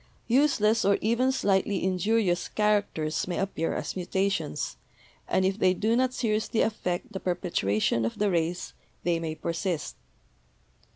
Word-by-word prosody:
"Useless 230 Hz, -4 st, +3 dB
or 200 Hz, 0 st, +4 dB
even 235 Hz, +4 st, +2 dB
slightly 200 Hz, -5 st, +1 dB
injurious 185 Hz, -1 st, +1 dB
characters 205 Hz, -8 st, 0 dB
may 180 Hz, -, -2 dB
ap 195 Hz, 0 st, -2 dB
pear 165 Hz, -, -1 dB
as -, -, -4 dB
mutations, 190 Hz, -, -1 dB, 0.5 s
and 190 Hz, -, +2 dB
if 190 Hz, +2 st, 0 dB
they 185 Hz, -1 st, +4 dB
do 220 Hz, +5 st, +1 dB
not 255 Hz, +1 st, +2 dB
seriously 220 Hz, -2 st, 0 dB
affect 180 Hz, -5 st, -2 dB
the 190 Hz, -, -3 dB
perpetuation 115 Hz, -, 0 dB
of 115 Hz, -, -2 dB
the 205 Hz, -1 st, +1 dB
race, 170 Hz, +1 st, -1 dB, 0.3 s
they 170 Hz, -1 st, +1 dB
may 160 Hz, -1 st, -3 dB
persist." 170 Hz, 0 st, -3 dB
190 Hz, 140 wpm, -27 LUFS, 175-215 Hz, 0.5 s, or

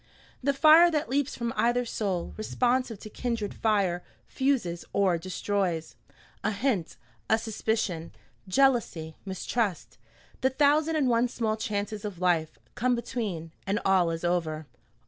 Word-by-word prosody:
The 280 Hz, +1 st, +1 dB
fire 315 Hz, +4 st, +8 dB
that 300 Hz, -7 st, -1 dB
leaps 285 Hz, +1 st, 0 dB
from 235 Hz, -1 st, -3 dB
either 240 Hz, +1 st, +2 dB
soul, 195 Hz, -6 st, -2 dB
responsive 245 Hz, +1 st, 0 dB
to -, -, -8 dB
kindred 230 Hz, -4 st, -3 dB
fire, 195 Hz, -5 st, +1 dB, 0.2 s
fuses 255 Hz, -11 st, 0 dB
or 185 Hz, -4 st, +2 dB
destroys. 185 Hz, -2 st, -2 dB, 0.5 s
A 215 Hz, -, +2 dB
hint, 210 Hz, -5 st, -1 dB, 0.3 s
a 220 Hz, -, +5 dB
suspicion, 220 Hz, -6 st, -2 dB, 0.4 s
jealousy, 190 Hz, -9 st, +2 dB
mistrust, 190 Hz, 0 st, -2 dB, 0.4 s
the 260 Hz, -, +4 dB
thousand 295 Hz, +4 st, +3 dB
and 295 Hz, -4 st, +2 dB
one 240 Hz, 0 st, +3 dB
small 225 Hz, -2 st, -1 dB
chances 210 Hz, -1 st, -3 dB
of 205 Hz, -5 st, -5 dB
life, 170 Hz, -3 st, +1 dB, 0.2 s
come 250 Hz, +1 st, +1 dB
between, 210 Hz, -9 st, -4 dB, 0.2 s
and 200 Hz, +2 st, +1 dB
all 185 Hz, -3 st, +4 dB
is 165 Hz, 0 st, -4 dB
over. 160 Hz, -3 st, -1 dB
215 Hz, 135 wpm, -28 LUFS, 180-245 Hz, 0.5 s, fire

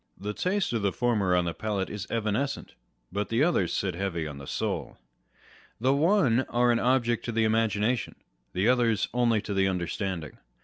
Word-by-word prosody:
The 105 Hz, +2 st, -4 dB
taste 185 Hz, -, 0 dB
of 115 Hz, -, 0 dB
the 100 Hz, -1 st, +1 dB
former 105 Hz, -7 st, +1 dB
on 90 Hz, -1 st, +2 dB
the 85 Hz, -, -2 dB
palate 100 Hz, -2 st, -2 dB
is 105 Hz, -1 st, -6 dB
evanescent; 115 Hz, +5 st, -2 dB, 0.4 s
but 100 Hz, +1 st, -2 dB
the 115 Hz, +5 st, +2 dB
others 155 Hz, -, +2 dB
sit 95 Hz, -2 st, -1 dB
heavy 85 Hz, -3 st, -2 dB
on 75 Hz, -2 st, -7 dB
the 70 Hz, -, -10 dB
soul. -, -, -3 dB, 0.8 s
The 130 Hz, +4 st, +3 dB
one 150 Hz, -, +3 dB
are 120 Hz, 0 st, +3 dB
an 120 Hz, -, +2 dB
object 120 Hz, -2 st, +2 dB
to 120 Hz, -, -2 dB
the 115 Hz, 0 st, +2 dB
imagina 110 Hz, +1 st, +2 dB
tion: 120 Hz, -, -7 dB, 0.4 s
the 95 Hz, +4 st, +1 dB
others 120 Hz, -4 st, +3 dB
only 115 Hz, -3 st, +2 dB
to 105 Hz, -, -3 dB
the 95 Hz, 0 st, +2 dB
understanding. 90 Hz, -3 st, -3 dB
110 Hz, 185 wpm, -28 LUFS, 95-120 Hz, 0.8 s, The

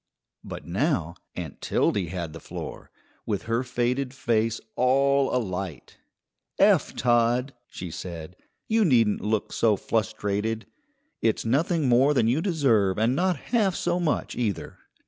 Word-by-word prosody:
But -, -, -8 dB
now 90 Hz, -, 0 dB, 0.2 s
Aunt -, -, -7 dB
Tildy 95 Hz, -4 st, +1 dB
had 85 Hz, -2 st, -5 dB
the 80 Hz, -, -8 dB
floor, -, -, -8 dB, 0.4 s
with 100 Hz, -3 st, -1 dB
her 115 Hz, +2 st, 0 dB
faded 125 Hz, +1 st, -1 dB
face 115 Hz, -2 st, 0 dB, 0.2 s
all 135 Hz, +2 st, +3 dB
alight. 95 Hz, -, -4 dB, 0.6 s
"Eph -, -, +4 dB
Todd," 120 Hz, +2 st, +2 dB
she 90 Hz, -2 st, -7 dB
said, 85 Hz, 0 st, -7 dB, 0.3 s
"you 225 Hz, 0 st, +3 dB
needn't 115 Hz, -, +3 dB
look 105 Hz, 0 st, -1 dB
so 110 Hz, -2 st, +3 dB
flustrated. 110 Hz, +1 st, -1 dB, 0.6 s
It's 110 Hz, 0 st, +1 dB
nothing 150 Hz, +5 st, +1 dB
more 130 Hz, +4 st, +4 dB
than 115 Hz, -4 st, +3 dB
you 130 Hz, +7 st, +2 dB
deserve 125 Hz, -, +2 dB
and 115 Hz, +4 st, +2 dB
not 180 Hz, +1 st, +1 dB, 0.2 s
half 205 Hz, -6 st, +3 dB
so 175 Hz, 0 st, 0 dB
much 165 Hz, -4 st, -1 dB
either. 110 Hz, -6 st, -3 dB
115 Hz, 135 wpm, -26 LUFS, 105-140 Hz, 0.6 s, Eph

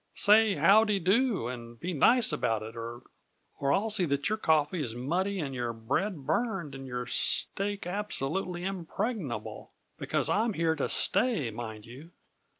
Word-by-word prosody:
"Say 215 Hz, 0 st, +5 dB
how 215 Hz, +3 st, +6 dB
de 210 Hz, -2 st, +1 dB
do 195 Hz, -, +1 dB
and 120 Hz, -2 st, -8 dB
be 180 Hz, +2 st, -3 dB
nice 235 Hz, -, +4 dB
about 115 Hz, -7 st, 0 dB
it, 110 Hz, +1 st, -9 dB
or 115 Hz, +1 st, -7 dB, 0.6 s
I'll 195 Hz, +11 st, +1 dB
see 195 Hz, -4 st, +2 dB
that 140 Hz, +1 st, 0 dB
your 215 Hz, -, 0 dB
coffee 160 Hz, 0 st, +2 dB
is 120 Hz, -5 st, -4 dB
muddy 180 Hz, +10 st, -1 dB
and 140 Hz, -5 st, -3 dB
your 120 Hz, -2 st, -3 dB
bread 140 Hz, -, -2 dB
burned 175 Hz, -, -1 dB
and 135 Hz, 0 st, -8 dB
your 125 Hz, -1 st, -4 dB
steak 200 Hz, +10 st, -1 dB
absolutely 180 Hz, -2 st, -2 dB
impregnable; 185 Hz, -, -4 dB, 0.3 s
because -, -, 0 dB
I'm 220 Hz, +2 st, +1 dB
here 165 Hz, -2 st, +1 dB
to 145 Hz, -, -2 dB
stay, 210 Hz, -, +1 dB
mind 110 Hz, -1 st, -7 dB
you. 130 Hz, +8 st, -12 dB
160 Hz, 155 wpm, -29 LUFS, 125-200 Hz, 0.6 s, how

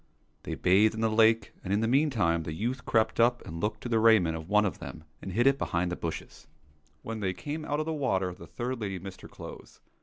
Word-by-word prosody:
They -, -, -5 dB
bathed 105 Hz, +4 st, +4 dB
in 110 Hz, -, -4 dB
the 110 Hz, -1 st, +2 dB
lake, 110 Hz, +1 st, +3 dB
and 95 Hz, -, -4 dB
in 100 Hz, +2 st, +2 dB
the 115 Hz, -, +1 dB
meantime 115 Hz, -, +2 dB
the 80 Hz, -1 st, -5 dB
youth 125 Hz, +7 st, -3 dB
crept 110 Hz, 0 st, +2 dB
up 120 Hz, +1 st, +3 dB
and 85 Hz, +1 st, -6 dB
took 105 Hz, +1 st, -1 dB
the 115 Hz, -2 st, 0 dB
raiment 110 Hz, -8 st, +5 dB
of 80 Hz, +1 st, -7 dB
one 105 Hz, 0 st, +4 dB
of 95 Hz, -, -3 dB
them 80 Hz, -, -8 dB, 0.2 s
and 95 Hz, -, -6 dB
hid 120 Hz, +6 st, +1 dB
it 135 Hz, 0 st, +4 dB
behind 90 Hz, +1 st, -1 dB
the -, -, -1 dB
bushes. 85 Hz, -2 st, -6 dB, 0.6 s
When 115 Hz, -1 st, -5 dB
they 95 Hz, -3 st, -1 dB
came 155 Hz, +7 st, -5 dB
out 145 Hz, 0 st, -2 dB
of 155 Hz, -, -1 dB
the 160 Hz, -, -2 dB
water 95 Hz, -, 0 dB
the -, -, -12 dB
third 125 Hz, 0 st, -4 dB
lady 100 Hz, -3 st, -3 dB
missed 95 Hz, +1 st, -9 dB
her -, -, -10 dB
clothes. -, -, -11 dB
110 Hz, 240 wpm, -29 LUFS, 90-120 Hz, 0.6 s, raiment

